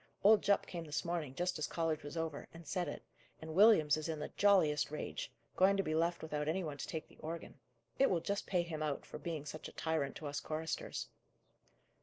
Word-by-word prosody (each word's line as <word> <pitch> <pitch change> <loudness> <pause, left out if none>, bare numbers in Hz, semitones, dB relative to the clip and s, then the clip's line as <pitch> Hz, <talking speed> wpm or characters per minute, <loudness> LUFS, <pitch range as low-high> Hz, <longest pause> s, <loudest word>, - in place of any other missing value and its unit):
Old 210 +1 +7
Jupp 200 - +3
came 170 -2 -5
this 150 +2 -2
morning, 165 -6 -2
just 175 0 -1
as 150 - 0
college 165 -2 -1
was 145 +3 -7
over, 160 -3 -3
and 165 0 -10
said 175 +4 -1
it: - - -6 0.4
and 160 0 -7
Williams 175 -7 +6
is 155 +1 -3
in 160 - -1
the 150 - -4
jolliest 180 -8 +4
rage; 150 - -4 0.2
going 195 +2 +5
to 195 - +2
be 155 - -1
left 170 +1 +1
without 150 -1 -2
any 180 +4 0
one 150 -3 -4
to - - -4
take 160 - -4
the - - -20
organ. 165 -2 -6 0.4
It 275 - +6
will 175 - +2
just 200 +5 -2
pay 180 -3 +2
him 160 -2 -5
out, 150 -2 -2
for - - -8
being 160 -4 -4
such 155 +1 -6
a - - -10
tyrant 160 -4 -1
to 155 - -7
us 145 0 -2
choristers." 160 +1 -3
160 Hz, 225 wpm, -36 LUFS, 150-175 Hz, 0.4 s, Old